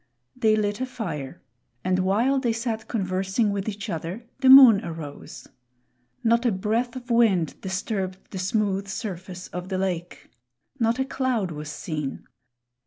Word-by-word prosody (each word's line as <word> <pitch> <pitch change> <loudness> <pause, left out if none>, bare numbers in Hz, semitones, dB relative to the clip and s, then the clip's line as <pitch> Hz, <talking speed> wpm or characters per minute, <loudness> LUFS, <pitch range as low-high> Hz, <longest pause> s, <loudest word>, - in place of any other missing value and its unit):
They 220 -4 +3
lit 205 +1 -1
a 260 - -1
fire, 165 - -6 0.4
and 185 0 +1
while 225 +9 +2
they 240 -3 0
sat 225 -1 -3
conversing 195 +1 0
with 200 +1 -2
each 205 +1 -6
other, 180 +5 -5
the 265 -1 +4
moon 255 -6 +10
arose. 160 -4 -8 0.8
Not 235 +1 +3
a 240 - +3
breath 225 +6 -1
of 250 -1 -7
wind 205 -9 +2
disturbed 190 0 -3
the 190 - -5
smooth 195 +1 0
surface 185 -3 -6
of 180 +1 -6
the 190 - -1
lake. 180 -2 -4 0.5
Not 230 +1 +2
a 265 - 0
cloud 255 -9 -1
was 150 -1 -6
seen. 150 -3 -5
200 Hz, 150 wpm, -25 LUFS, 185-230 Hz, 0.8 s, moon